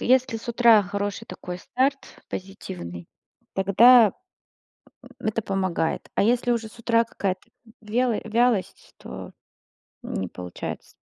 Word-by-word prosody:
если 255 -1 +3
с 225 +2 -10
утра 230 -3 +6
хороший 200 +2 -3
такой 180 0 -7
старт, 270 +7 0 0.3
позитивный, 90 - -7 0.5
тогда, 215 +4 +6 0.9
м, - - -14 0.2
это 220 +1 0
помогает. 190 -5 -1
А - - +3
если 245 +2 +2
уже 225 -2 -1
с 230 - -17
утра 230 0 +3
какая-то 195 -5 -4 0.3
вело 230 +2 +1
вялость, 230 -2 0
то, - - -9 0.7
м, - - -6
не 95 -2 -2
получается 90 -1 -7
215 Hz, 125 wpm, -25 LUFS, 190-240 Hz, 0.9 s, утра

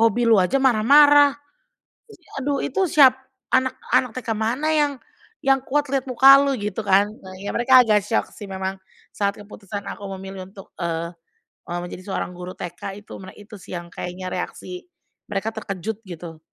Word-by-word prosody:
hobi 230 +1 +3
lu 225 -2 +5
aja 185 +9 +1
marah-marah, 285 +4 +6 0.8
ih 350 -6 -19
aduh 280 0 0
itu 390 - 0
siap 265 -4 +7 0.4
anak-anak 260 -1 +1
TK 240 - -9
mana 235 +8 -1
yang 295 -2 +2 0.5
yang 270 0 +4
kuat 290 +2 0
lihat 270 -2 0
muka 265 +2 +8
lu?" 280 -1 +1
Gitu 205 +1 -3
kan, 200 +1 +4
nah 185 0 -10
ya 200 - -5
mereka 255 +2 +6
agak 210 -3 +3
syok 225 - 0
sih 210 - -9
memang 190 0 -4 0.4
saat 200 -1 0
keputusan 205 -1 -8
aku - - -7 0.2
memilih 190 -1 -8
untuk, 195 -1 -13
eee 170 0 -3 0.6
eee, 175 0 -2
menjadi 175 +1 -8
seorang 180 - -3
guru 180 +1 -8
TK 180 +3 -7
itu - - -12
mere 185 - -11
itu 210 +1 -15
sih 180 - -9
yang 170 0 -9
kayaknya 180 +1 -6
reaksi 180 0 -6 0.4
mereka 210 +2 -2
terkejut 215 0 -5
gitu, 165 -2 -9
210 Hz, 170 wpm, -22 LUFS, 185-260 Hz, 0.8 s, muka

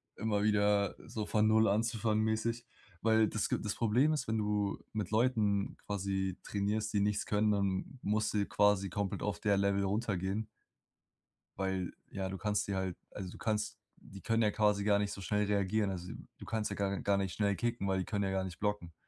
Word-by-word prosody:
immer 105 -2 0
wieder 105 -1 +3
so 110 -2 -3
von 110 0 +2
0 110 0 +5
anzufangen-mäßig, 110 +1 0 0.4
weil 110 0 +4
das 105 0 -1
ge - - +1
das 105 -1 -2
Problem 120 +7 +3
ist, 150 - -2
wenn 110 0 0
du 105 -1 0 0.2
mit 105 -2 -3
Leuten 110 -4 +2
quasi 95 -2 -2
trainierst, 105 +2 -1
die 100 - +2
nichts 105 +1 +1
können, 105 +1 +2
dann 100 +5 -1
musst 105 +1 0
du 105 - +1
j 100 - -1
quasi 105 -1 +3
komplett 100 +1 -2
auf 105 - -2
der 100 -2 +3
Level 100 0 +2
runtergehen. 100 0 -1 1.1
Weil, 95 -2 -1 0.2
ja, 95 -1 -3
du 95 - -4
kannst 105 0 0
dir 100 - -1
halt. 95 -2 -2
Also, 95 -3 -6
du - - -11
kannst 110 -1 -1 0.3
die 100 0 -11
können 115 0 +1
ja 105 - +4
quasi 105 -1 +2
gar 100 0 +4
nicht 105 0 -1
so 100 - -7
schnell 105 +2 +1
reagieren. 100 0 +1
Also, 90 -1 -5 0.3
du - - -10
kannst 110 -1 -1
ja - - -2
gar 100 -1 -1
gar 100 -1 +2
nicht 95 -2 -1
schnell 100 -2 +1
kicken, 115 -2 -1
weil 95 0 +1
die 95 - -2
können 100 -2 -1
ja 95 - 0
gar 95 0 0
nicht 90 -2 -7
blocken. 105 -5 -2
105 Hz, 205 wpm, -33 LUFS, 100-110 Hz, 1.1 s, 0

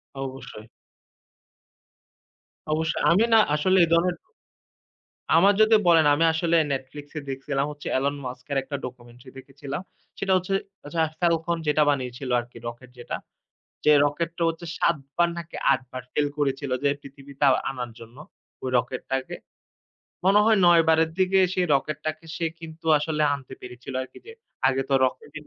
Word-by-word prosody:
অবশ্যই। 130 -5 -7 2.1
অবশ্যই 160 +1 -1
আমি 200 +6 +4
না 225 - +8 0.2
আসলে 185 +5 +2
এ - - -8
ধরনের। 175 +1 +3 1.2
আমার 195 +4 +5
যদি 220 0 +6
বলেন 165 -3 +6
আমি 165 +3 +2
আসলে 170 0 +1 0.2
Netflix 135 +2 -6
এ - - -4
দেখছিলাম 135 +1 -2
হচ্ছে 145 - -8
এলন 140 +2 0
মাস্ক 125 0 -7
এর 135 - +1
একটা 140 +1 -5
ডকুমেন্টারি 125 0 -10
দেখেছিলাম। 140 +4 -7 0.4
সেটা 195 -1 0
হচ্ছে 185 +2 -1 0.3
আচ্ছা 165 +2 -2 0.2
ফেলকন 170 0 +1
যেটা 150 +1 +3
বানিয়েছিল 130 -1 -3
আরকি 120 0 -12
রকেট 120 +2 -10
যেটা 120 - -5 0.7
যে, 150 - +6
রকেটটা 170 +3 -3
হচ্ছে 165 +1 -5
৭ 170 -1 +2 0.2
বার 175 0 +3
নাকি 170 0 -8 0.2
৮ 135 - +1
বার 130 -1 -5
Fail 145 -1 +1
করেছিল 135 -1 -1
যে, - - +5
পৃথিবীতে 140 +1 -6 0.3
আনার 125 -3 -5
জন্য 115 +2 -13 0.5
ওই 130 - -1
রকেটটাকে। 130 +2 -3 0.9
মনে 200 +2 +6
হয় 220 -2 +5
৯ 170 -1 +7
বারের 160 0 +4
দিকে 190 +1 +3
সেই 180 -1 0
রকেটটাকে 155 +3 -3
সে 165 - -1
কিন্তু 160 0 -11
আসলে 155 0 -2
আনতে 130 -1 -11
পেরেছিল 125 +1 -9
আরকি 130 - -14
যে, 455 - -9 0.3
আগে 135 0 +1
তো - - +1
রকেট 145 +3 -5
145 Hz, 150 wpm, -25 LUFS, 130-170 Hz, 2.1 s, না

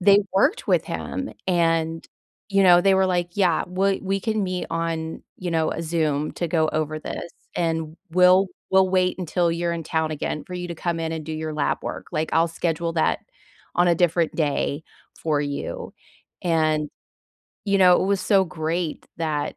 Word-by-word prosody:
they 200 +2 +6
worked 290 - +2
with - - +3
him, 270 0 -4 0.2
and, 165 -2 +1 0.4
you 195 -1 +3
know, 175 -2 +7
they 195 +1 +4
were 190 0 +3
like, 175 -1 0
"Yeah. 180 -5 +2
We 190 +2 +1
we 195 0 -1
can 220 0 -1
meet 185 -1 -3
on, 165 -1 -3
you 180 -1 -4
know, 160 -1 +1
Zoom 155 -3 0
to 170 - -2
go 160 -1 +2
over 155 0 -1
this, 170 - -6 0.3
and 165 -1 -1 0.2
we'll 185 +2 +6 0.2
we'll 190 0 +5
wait 185 0 +1
until 175 -1 0
you're 170 0 -1
in 165 -1 -3
town 160 0 -1
again 150 0 -3
for 180 - -7
you 180 0 -4
to 170 - -4
come 170 0 -2
in 160 0 -2
and 160 -2 -4
do 160 - -4
your 155 0 -4
lab 150 -1 0
work, - - -5
like, 155 +1 -1
I'll 165 +1 +3
schedule 165 0 -2
that 160 - +2 0.6
on 175 0 +4
a 170 - +4
different 170 -2 +2
day 150 -1 0 0.4
for 150 -3 +1
you." 145 -1 -4 0.5
and, 155 -3 +1 0.8
you 200 -1 +2
know, 180 -2 +6
it - - 0
was 200 -1 +1
so 195 -3 +3
great 160 0 -3
that 155 -3 -2
170 Hz, 185 wpm, -24 LUFS, 160-185 Hz, 0.8 s, know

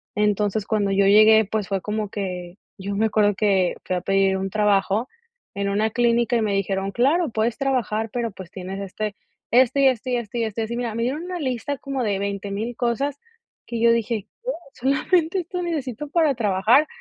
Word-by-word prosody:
Entonces, 210 0 +1
cuando 210 -3 0
yo 195 0 +3
llegué, 215 +2 +7
pues 210 -1 -2
fue 195 -1 -1
como 210 -1 -3
que, 180 -3 -5 0.2
yo 200 +1 -4
me 220 +2 +2
acuerdo 205 -2 +2
que 195 -4 +2
fui 185 - -1
a 180 - -2
pedir 195 0 +2
un 195 0 -3
trabajo 210 +2 +1 0.5
en 200 0 -1
una 215 +2 +1
clínica 240 +1 +2
y 230 - +2
me 210 -2 0
dijeron: 195 0 -1
"Claro, 290 - +2
puedes 225 +1 -1
trabajar, 230 -5 0
pero 235 -3 -2
pues 190 -3 -10
tienes 190 +1 -6
este, 205 +2 -4 0.4
este 255 +3 +4
y 270 - +6
este 255 0 0
y - - +2
este 235 +1 -4
y - - +1
este 220 +1 -3
así". 235 +2 -4
Mira, 235 -2 -3
me 230 - -1
dieron 285 +7 -2
una 360 0 -4
lista 265 0 -2
como 275 -1 -4
de 205 -3 0
20,000 200 +3 -3
cosas 265 +4 -1 0.5
que 235 -1 -4
yo 235 0 +5
dije: 230 -2 -1 0.2
"Oh, - - -1 0.2
solamente 320 +7 +1
esto 360 +1 -5
necesito 295 -5 -3
para 315 -3 +3
trabajar". 225 +6 +3
220 Hz, 200 wpm, -23 LUFS, 200-250 Hz, 0.5 s, llegué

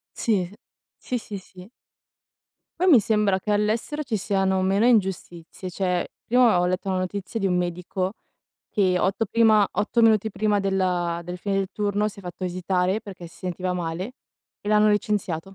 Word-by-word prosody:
Sì, 215 -5 +1
uhm, 180 +3 -9 0.4
sì, 250 - -3
sì, 210 -3 -7
sì. 185 0 -14 1.1
Poi 370 - +2
mi 270 -9 +8
sembra 210 -2 +1
che 210 - -3
all'estero 215 +8 0
ci 245 -7 -2
siano 190 -1 +1
meno 195 +4 +2
ingiustizie, 185 -5 -1
cioè, 180 -1 0 0.2
prima 240 -6 +4
ho 180 - +2
letto 185 +2 -2
una 190 - 0
notizia 195 +4 -3
di 195 - -1
un 180 -2 +2
medico, 180 +2 -2 0.6
che 185 -3 +2
8 195 +5 +1
prima 220 -3 +4
8 210 +4 0
minuti 220 -1 +4
prima 205 +1 +1
della 180 -3 0
del 180 +1 -5
fine 195 +2 -2
del 195 -1 0
turno, 205 0 0
si 205 -1 -6
è - - -17
fatto 180 +1 -6
visitare 185 +2 0
perché 190 -5 -10
si 165 - -15
sentiva 180 0 -3
male 180 +5 -4 0.5
e 205 - -6
l'hanno 215 0 +5
licenziato. 205 -6 0
195 Hz, 175 wpm, -24 LUFS, 180-210 Hz, 1.1 s, mi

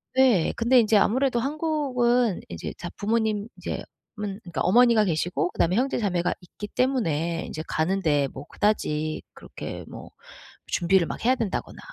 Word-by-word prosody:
네. 250 -10 +4
근데 240 +2 +4
인제 220 -1 +3
아무래도 245 +4 +2
한국은 255 - +1
인제 85 -1 -6
자 175 - -6
부모님 215 -1 0
이제 - - -4 0.7
어머니가 220 - +5
계시고 175 +1 0
그 - - -18
다음에 175 +2 +2
형제 260 +5 +1
자매가 180 -6 0
있기 195 +4 -9
때문에 170 - 0
인제 155 - -5
가는 185 +5 0
데에 145 -5 +2
뭐 135 +1 -10
그다지 155 -8 -1
그렇게 - - -8
뭐 - - -10 0.6
준비를 175 0 +2
막 - - -6
해야 255 - +5
된다거나 225 -5 -3
210 Hz, 325 characters per minute, -25 LUFS, 170-245 Hz, 0.7 s, 어머니가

